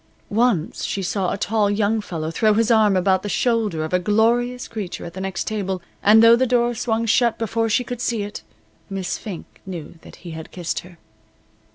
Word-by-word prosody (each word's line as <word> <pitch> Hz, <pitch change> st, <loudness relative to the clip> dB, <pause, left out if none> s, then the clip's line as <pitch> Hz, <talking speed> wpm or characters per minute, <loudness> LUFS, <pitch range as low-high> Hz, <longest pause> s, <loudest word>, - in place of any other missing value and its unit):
Once 215 Hz, -7 st, +1 dB
she 195 Hz, -, -2 dB
saw 185 Hz, 0 st, -1 dB
a -, -, -2 dB
tall 210 Hz, 0 st, +1 dB
young 210 Hz, +1 st, +1 dB
fellow 160 Hz, -5 st, -4 dB
throw 215 Hz, +5 st, +2 dB
his 225 Hz, +1 st, +2 dB
arm 215 Hz, -4 st, +4 dB
about 190 Hz, 0 st, +2 dB
the 205 Hz, -, -5 dB
shoulder 220 Hz, -9 st, 0 dB
of 160 Hz, -, -7 dB
a 180 Hz, -, +4 dB
glorious 235 Hz, +5 st, +1 dB
creature 210 Hz, -6 st, -6 dB
at 170 Hz, -, -8 dB
the 190 Hz, -, -6 dB
next 190 Hz, -1 st, -2 dB
table, 195 Hz, -3 st, -2 dB, 0.2 s
and 220 Hz, +2 st, +6 dB
though 230 Hz, 0 st, +8 dB
the 255 Hz, +2 st, +1 dB
door 240 Hz, 0 st, +2 dB
swung 230 Hz, 0 st, -1 dB
shut 235 Hz, +1 st, +3 dB
before 225 Hz, 0 st, -1 dB
she 250 Hz, +4 st, +2 dB
could 245 Hz, -1 st, -6 dB
see 230 Hz, -4 st, -1 dB
it, 205 Hz, +1 st, -7 dB, 0.5 s
Miss 190 Hz, -2 st, -3 dB
Fink 195 Hz, -7 st, -9 dB
knew 170 Hz, -3 st, -8 dB
that -, -, -13 dB
he 170 Hz, -, -6 dB
had 160 Hz, 0 st, -8 dB
kissed 175 Hz, -2 st, -3 dB
her. 175 Hz, -1 st, -14 dB
210 Hz, 205 wpm, -22 LUFS, 185-230 Hz, 0.5 s, though